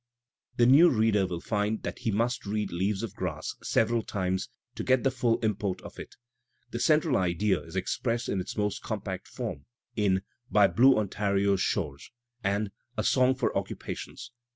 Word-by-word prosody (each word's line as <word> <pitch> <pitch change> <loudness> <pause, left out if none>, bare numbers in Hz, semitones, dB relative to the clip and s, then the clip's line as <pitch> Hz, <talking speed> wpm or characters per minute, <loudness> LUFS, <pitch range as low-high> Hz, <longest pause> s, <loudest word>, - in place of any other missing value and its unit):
The 120 - +5
new 145 +8 +7
reader 110 -4 +2
will 85 -2 -4
find 105 +1 -1
that - - -5
he - - -1
must 115 +1 0
read 105 -1 -2
"Leaves 95 +4 -1
of 110 -4 -4
Grass'' 85 -6 -4
several 115 +1 +1
times 95 -3 -2 0.2
to - - -5
get 130 -1 +3
the 135 - +3
full 120 -3 +1
import 105 -4 -1
of - - -10
it. - - -9 0.6
The 120 - -3
central 155 0 +3
idea 95 +2 +1
is 80 - -12
expressed 115 +5 -1
in 100 - -1
its 90 - -7
most 105 -1 -1
compact - - -5
form 70 - -6 0.3
in 95 -3 +1 0.3
"By 105 -4 +5
Blue 130 +2 +5
Ontario's 100 -1 +1
Shores" 70 -8 -2 0.3
and 100 +1 0 0.3
"A - - 0
Song 130 0 +3
for 125 - -1
Occupations." - - -5
105 Hz, 170 wpm, -28 LUFS, 95-115 Hz, 0.6 s, new